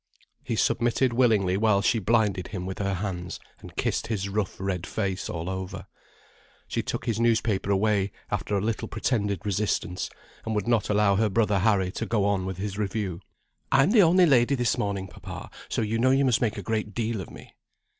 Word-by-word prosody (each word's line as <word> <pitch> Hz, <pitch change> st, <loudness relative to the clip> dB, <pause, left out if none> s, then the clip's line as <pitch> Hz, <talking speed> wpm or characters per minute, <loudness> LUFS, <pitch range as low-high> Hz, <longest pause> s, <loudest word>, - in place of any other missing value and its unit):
He -, -, -2 dB
submitted 120 Hz, +1 st, +2 dB
willingly 110 Hz, -7 st, +3 dB
while 100 Hz, -2 st, +3 dB
she 115 Hz, -, +3 dB
blinded 105 Hz, -3 st, +1 dB
him 90 Hz, -3 st, -5 dB
with 95 Hz, 0 st, -5 dB
her 100 Hz, -1 st, 0 dB
hands, 90 Hz, -2 st, -4 dB, 0.2 s
and -, -, -12 dB
kissed -, -, -1 dB
his 100 Hz, -4 st, -2 dB
rough 100 Hz, -1 st, -2 dB
red 95 Hz, -2 st, -2 dB
face 95 Hz, -3 st, -2 dB
all 85 Hz, 0 st, -4 dB
over. 95 Hz, 0 st, -5 dB, 0.8 s
She -, -, -1 dB
took -, -, -4 dB
his 115 Hz, -2 st, -1 dB
newspaper 110 Hz, -4 st, +1 dB
away 100 Hz, 0 st, +2 dB, 0.2 s
after 105 Hz, -, -1 dB
a -, -, 0 dB
little 110 Hz, +1 st, -2 dB
pretended 105 Hz, -4 st, -1 dB
resistance, 100 Hz, -3 st, -1 dB, 0.3 s
and 110 Hz, -, -2 dB
would 105 Hz, 0 st, -1 dB
not 115 Hz, -3 st, +2 dB
allow 105 Hz, -1 st, +3 dB
her 110 Hz, 0 st, +2 dB
brother 105 Hz, -1 st, +2 dB
Harry 95 Hz, -3 st, +2 dB
to 115 Hz, -, -4 dB
go 105 Hz, -1 st, +1 dB
on 100 Hz, -2 st, 0 dB
with 95 Hz, -2 st, -4 dB
his 100 Hz, +1 st, -4 dB
review. 100 Hz, -4 st, -2 dB, 0.5 s
"I'm 135 Hz, +8 st, +5 dB
the 220 Hz, -2 st, +7 dB
only 180 Hz, +1 st, +6 dB
lady 135 Hz, -3 st, +4 dB
this 120 Hz, -3 st, +1 dB
morning, 100 Hz, -2 st, -2 dB
papa, -, -, -9 dB, 0.2 s
so -, -, 0 dB
you 110 Hz, +1 st, -1 dB
know 130 Hz, +2 st, +4 dB
you 135 Hz, +1 st, +4 dB
must 125 Hz, -4 st, +2 dB
make 110 Hz, -4 st, 0 dB
a 100 Hz, -, -5 dB
great 110 Hz, 0 st, -2 dB
deal 115 Hz, -3 st, -1 dB
of 90 Hz, -, -9 dB
me." -, -, -13 dB
105 Hz, 195 wpm, -26 LUFS, 95-115 Hz, 0.8 s, the